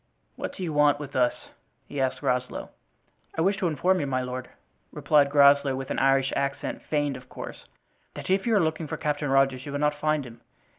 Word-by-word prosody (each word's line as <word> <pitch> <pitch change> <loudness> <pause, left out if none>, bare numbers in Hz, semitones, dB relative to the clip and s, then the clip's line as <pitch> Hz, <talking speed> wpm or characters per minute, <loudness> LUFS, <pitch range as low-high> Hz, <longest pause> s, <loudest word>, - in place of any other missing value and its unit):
"What - - -5
do 190 - -6
you 165 -3 -3
want 150 -1 +4
with 145 -1 -8
us?" 125 -1 0 0.4
he 145 -1 -4
asked 130 -1 +1
of - - -16
Groslow. 125 0 -2 0.7
"I - - +1
wish 195 +4 +2
to 185 - 0
inform 180 +4 +1
you, 145 - -2
my 130 -1 -1
lord," 125 0 -5 0.4
replied 145 -2 +3
Groslow, 140 -1 +5
with 135 0 -5
an - - -1
Irish 135 0 +3
accent, 140 0 -2
feigned 145 -3 -1
of 125 0 -15
course, - - -9 0.5
"that - - -7
if 190 +3 +1
you 225 - +3
are - - +5
looking 160 0 -2
for - - -4
Captain 145 -1 -1
Rogers 135 -1 +2
you - - -5
will 145 - -2
not 150 +1 +2
find 150 -1 0
him. 115 -1 -12
145 Hz, 215 wpm, -26 LUFS, 135-150 Hz, 0.7 s, Groslow